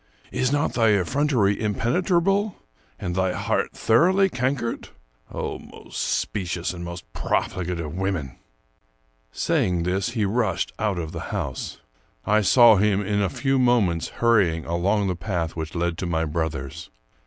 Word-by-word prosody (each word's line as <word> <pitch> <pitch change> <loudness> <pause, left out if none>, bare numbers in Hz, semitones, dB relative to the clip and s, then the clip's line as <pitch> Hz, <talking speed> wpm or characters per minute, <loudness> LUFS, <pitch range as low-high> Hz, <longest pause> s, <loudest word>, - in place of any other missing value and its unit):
Is 125 - 0
not 145 0 +1
thy 115 -3 +4
effrontery 120 -3 +1
impenetrable 175 - +1 0.4
and 90 - -4
thy 95 0 +1
heart - - -1
thoroughly 185 +11 +3
cankered? 125 -4 -2 0.4
Oh, - - -4
most - - -8
specious 90 -3 -2
and 85 -1 -7
most 85 0 -7
profligate 90 -1 -1
of 75 -3 -5
women! 90 -8 -3 0.5
" - - -42 0.2
Saying 90 +6 0
this, 90 +4 0
he 105 - +2
rushed 100 -3 0
out 105 -4 0
of 80 -2 -4
the - - -5
house. - - -4 0.5
I 105 +1 +3
saw 115 +2 +7
him 105 0 +2
in 105 +1 0
a 95 - +1
few 135 +5 0
moments 110 -10 +2
hurrying 100 -9 +2
along 95 +5 +1
the 90 - -1
path 85 -2 -3
which 80 0 -5
led 85 0 -1
to 90 - -2
my 80 -1 0
brother's. 75 -4 -4
95 Hz, 150 wpm, -24 LUFS, 85-115 Hz, 0.5 s, saw